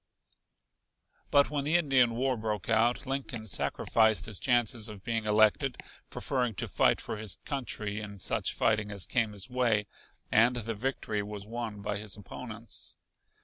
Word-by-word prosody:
But 140 0 +4
when 145 -2 -1
the 150 +4 +1
Indian 135 -8 +4
war 130 +2 +1
broke 110 -3 -3
out 115 +4 +2
Lincoln 135 -4 -4
sacrificed 110 +1 +2
his 105 -4 -3
chances 120 -3 +1
of 100 -3 -10
being 115 -1 -1
elected, 110 +5 +3 0.3
preferring 125 -5 -1
to - - -2
fight - - +3
for - - -5
his 105 -3 -2
country 105 -7 -2
in 100 -1 -8
such - - +2
fighting 110 -2 +1
as 100 -2 -1
came 115 -3 +1
his 100 0 -2
way, 120 -5 +1 0.5
and 115 +3 +5
the 115 -1 -2
victory 110 -2 -2
was 100 -1 -7
won 110 -2 -5
by 105 0 -2
his 105 -1 -5
opponents. 115 +3 -7
110 Hz, 155 wpm, -30 LUFS, 105-125 Hz, 0.5 s, and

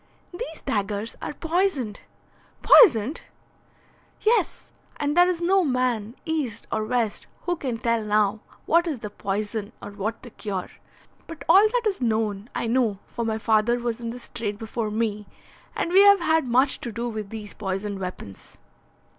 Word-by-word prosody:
"These 350 -4 -7
daggers 205 +1 -2
are - - -4
poisoned." 325 - -1 0.6
"Poisoned!" 280 - +6 1.0
"Yes, 460 +2 +1 0.3
and 290 0 -1
there 355 +1 +6
is 355 -2 -1
no 375 +2 +3
man, 250 -5 0
East 310 -9 -2
or 215 - 0
West, 225 -1 -1 0.2
who 350 - 0
can 255 -7 -3
tell 230 -1 0
now 210 0 +2 0.3
what 340 +2 +3
is 285 -8 -3
the 210 - -6
poison 205 +2 -3
or 205 - -8
what 210 +3 -4
the 245 - -10
cure. 195 -4 -5 0.6
But 330 -1 -9
all 390 +6 +7
that 475 +1 -1
is 400 -9 0
known 220 -2 -1
I - - -1
know, 230 -3 +1
for 235 - -5
my 220 -1 -1
father 220 +2 +2
was 240 -1 -3
in 230 -1 -4
this 245 +1 -9
trade 215 -4 -4
before 225 0 -3
me, 210 -1 -2 0.5
and 340 - -1
we 385 +2 +7
have 400 -2 +7
had 320 -4 +2
much 260 +3 +2
to 235 - -4
do 235 +2 -3
with 215 -3 -5
these 215 -1 -8
poisoned 195 0 -4
weapons." 180 - -8
230 Hz, 165 wpm, -25 LUFS, 210-315 Hz, 1.0 s, all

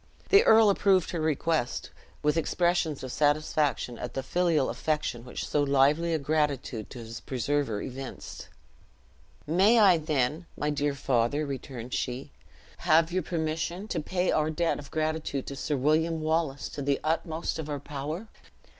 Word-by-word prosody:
The 400 +1 +7
earl 220 -2 +7
approved 190 -2 +2
her 170 - -2
request, 155 -3 -1 0.3
with 150 0 +2
expressions 165 -2 0
of 130 - -5
satisfaction 145 -4 +1
at 125 - -6
the 135 - -2
filial 165 -3 +1
affection 150 -6 -2
which 125 - -6
so 150 - +1
lively 145 +4 +3
a 160 - +2
gratitude 140 -6 -1
to - - -10
his 115 -1 -7
preserver 130 -3 -1
evinced. 130 +1 -7 1.0
"May 195 +9 +4
I, 190 -6 +6
then, 155 +1 -1
my 150 0 0
dear 145 -1 0
father," 135 +2 +1
returned 130 -3 -6
she, 130 +3 -3 0.5
"have 165 0 +3
your 185 +1 0
permission 165 +4 -3
to - - -1
pay 180 +4 0
our 155 0 +1
debt 165 +1 0
of 140 - -10
gratitude 155 -3 -2
to 140 - -6
Sir 145 +1 -2
William 160 +4 +2
Wallace 155 -3 -1
to 145 - -6
the 140 0 +1
utmost 160 +1 -1
of 155 -1 -5
our 145 -1 -3
power?" 150 +8 -5
150 Hz, 155 wpm, -28 LUFS, 135-165 Hz, 1.0 s, The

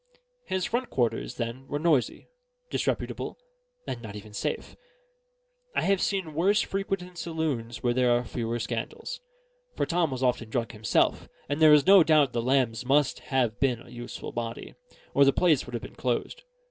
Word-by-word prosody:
His 185 -1 -1
front 240 +2 -1
quarters, 120 -1 -1
then, 120 +2 -5
were 145 - -2
noisy, 150 -5 +1 0.4
disreputable, - - -2 0.5
and - - -5
not 110 -3 -8
even 105 0 -10
safe. - - -3 1.0
I - - +2
have 195 -1 +2
seen 190 -6 -1
worse 195 +7 +3
frequented 195 -2 -3
saloons 150 -9 -3
where 120 -1 +2
there 125 0 +3
were 120 0 +3
fewer 115 -1 -3
scandals; 115 0 -4 0.5
for - - 0
Tom 170 -2 +1
was 130 -1 -4
often 120 -3 +1
drunk 115 0 -2
himself; 110 -1 +1 0.2
and 145 +3 -2
there 155 -1 +8
is 150 -2 +6
no 195 0 +8
doubt 155 -5 +4
the 120 - 0
Lambs 125 -2 +1
must 140 +2 +2
have 125 -5 +1
been 130 -4 +1
a - - -15
useful 120 +1 -7
body, 115 0 -5 0.4
or 140 - +6
the 140 - +6
place 160 -1 +2
would 125 - -6
have 115 - -4
been - - -9
closed. 130 - -2
130 Hz, 170 wpm, -27 LUFS, 120-160 Hz, 1.0 s, there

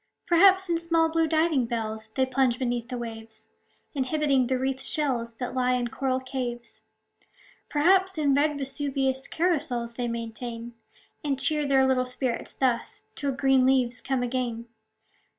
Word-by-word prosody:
Perhaps, 380 +2 +5
in 340 -1 0
small, 330 -1 +2
blue 325 0 +1
diving 315 -5 +2
bells 220 -1 -4
They 260 +4 +1
plunge 260 -2 +1
beneath 245 -2 -2
the 250 - -4
waves, 225 -1 -8 0.4
Inhabiting 275 -2 +1
the 260 0 +1
wreathed 265 +1 -2
shells 255 -7 0
That 250 +1 -5
lie 255 -1 +1
in 245 -1 -1
coral 265 0 -1
caves. 250 -2 -6 0.9
Perhaps, 375 +4 +3
in 290 -3 +2
red 295 +1 +2
Vesuvius 270 -1 -1
Carousals 295 -9 -1
they 245 -1 -1
maintain; 230 0 -5 0.5
And 280 -3 -1
cheer 300 +1 +1
their 270 -1 +4
little 260 -1 +2
spirits 250 -1 -3
thus, 250 -3 -1
Till 280 -1 -2
green 270 -1 +3
leaves 255 -2 +2
come 265 -2 -1
again. 240 -2 -2
260 Hz, 150 wpm, -26 LUFS, 240-290 Hz, 0.9 s, Perhaps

